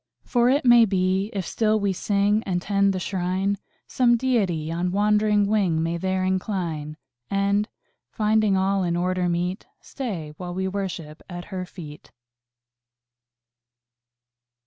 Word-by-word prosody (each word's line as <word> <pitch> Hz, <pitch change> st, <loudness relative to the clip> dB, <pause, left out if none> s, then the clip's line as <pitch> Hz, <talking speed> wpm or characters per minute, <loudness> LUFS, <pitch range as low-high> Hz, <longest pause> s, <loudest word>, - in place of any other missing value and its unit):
"For 240 Hz, 0 st, +2 dB
it 275 Hz, +1 st, +2 dB
may 240 Hz, -1 st, +7 dB
be, 190 Hz, 0 st, 0 dB
if 195 Hz, -3 st, -3 dB
still 215 Hz, +2 st, +1 dB
we 200 Hz, -1 st, 0 dB
sing 205 Hz, +3 st, +1 dB
And 180 Hz, -2 st, -1 dB
tend 200 Hz, +1 st, +2 dB
the 190 Hz, -, -2 dB
Shrine, 190 Hz, +2 st, -1 dB, 0.3 s
Some 240 Hz, -2 st, +3 dB
Deity 195 Hz, -11 st, 0 dB
on 175 Hz, +2 st, -1 dB
wandering 210 Hz, +1 st, +3 dB
wing 195 Hz, -6 st, +1 dB
May 165 Hz, +1 st, -1 dB
there 185 Hz, +1 st, -1 dB
incline; 175 Hz, -6 st, -2 dB, 0.3 s
And, 200 Hz, +1 st, +1 dB, 0.4 s
finding 215 Hz, -2 st, +2 dB
all 195 Hz, +1 st, +1 dB
in 170 Hz, -2 st, 0 dB
order 180 Hz, 0 st, 0 dB
meet, 180 Hz, +3 st, -2 dB
Stay 185 Hz, -, -6 dB
while 180 Hz, -1 st, -6 dB
we 190 Hz, 0 st, -1 dB
worship 185 Hz, -5 st, -5 dB
at 175 Hz, -1 st, -7 dB
Her 185 Hz, -1 st, -4 dB
feet." 155 Hz, -6 st, -11 dB
190 Hz, 135 wpm, -24 LUFS, 180-210 Hz, 0.4 s, may